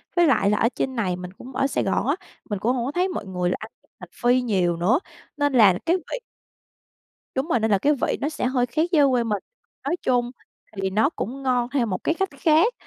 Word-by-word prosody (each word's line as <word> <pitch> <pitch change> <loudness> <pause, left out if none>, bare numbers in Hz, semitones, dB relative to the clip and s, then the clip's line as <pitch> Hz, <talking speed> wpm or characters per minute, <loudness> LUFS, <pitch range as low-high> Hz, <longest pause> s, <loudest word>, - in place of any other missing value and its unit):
Với 345 -1 +5
lại 200 -8 +3
là 210 - +2
ở 230 - +3
trên 265 -1 -2
này, 190 -7 0
mình 180 0 -8
cũng 250 +6 -12
ở 275 - +2
Sài - - -1
Gòn - - 0
á, - - +2 0.3
mình 205 -2 -2
cũng 240 +6 +1
hổng 240 -2 -1
có 270 - -2
thấy 360 +4 +1
mọi 360 - -4
người 180 -1 -1
là - - 0
ăn 220 +1 -9
với - - -35
hành 180 -3 -10 0.3
phi 255 - +2
nhiều 185 -8 +1
nữa, 205 - +3 0.4
nên 290 -1 +1
là 205 -7 +6
cái 335 +2 +3
vị 365 +7 -6 1.2
Đúng 265 +3 -1
rồi, 285 -8 +2
nên 220 0 0
là 200 - +5
cái 290 +10 +2
vị - - +1
nó 290 - 0
sẽ 310 - -3
hơi 250 -1 +1
khác 310 +8 0
với 315 -5 +5
ở 280 - +6
quê 250 -2 +2
mình. 210 -3 -2 0.4
Nói 290 +5 0
chung 245 -1 +1 0.4
thì 195 -1 -1
nó 215 +7 +2
cũng 275 -4 -5
ngon 250 -2 +1
theo 260 -3 +1
một 185 -5 -3
cái 325 - +1
cách 385 +2 -1
khác, 330 +9 +4
245 Hz, 255 wpm, -24 LUFS, 205-290 Hz, 1.2 s, là